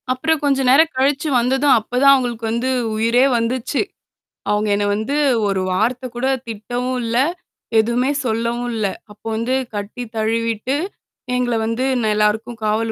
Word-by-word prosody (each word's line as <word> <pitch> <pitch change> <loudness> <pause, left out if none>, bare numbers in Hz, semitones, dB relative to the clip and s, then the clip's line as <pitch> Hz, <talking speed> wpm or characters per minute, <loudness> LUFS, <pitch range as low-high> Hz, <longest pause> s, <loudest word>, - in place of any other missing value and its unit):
அப்புறம் 315 +5 0
கொஞ்சம் 270 -2 +2
நேரம் 315 +5 +5
கழிச்சு 275 +3 +1
வந்ததும் 265 +3 +3
அப்ப 230 +3 -5
தான் 275 - +8
அவுங்களுக்கு 240 -4 -1
வந்து 235 +3 -1 0.3
உயிரே 230 +4 +3
வந்துச்சு. 240 +4 -1 0.7
அவுங்க 210 0 +1
என்ன 205 0 0
வந்து 220 +7 -2 0.3
ஒரு 195 -1 0
வார்த்தைகூட 245 +5 -1 0.2
திட்டவும் 245 +4 -3
இல்ல. 230 +1 -1 0.6
எதுவுமே 240 +4 +1
சொல்லவும் 235 +1 -1
இல்ல. 215 -2 -1 0.3
அப்போ 210 +1 -18
வந்து 230 +4 0 0.2
கட்டி 205 +4 -5
தழுவிட்டு, 230 +3 -1 0.6
எங்கள 245 -1 0
வந்து 230 +3 -1 0.2
ந - - -1
எல்லாருக்கும் 220 +3 0
காவல் 220 +1 0
235 Hz, 140 wpm, -19 LUFS, 220-255 Hz, 0.7 s, தான்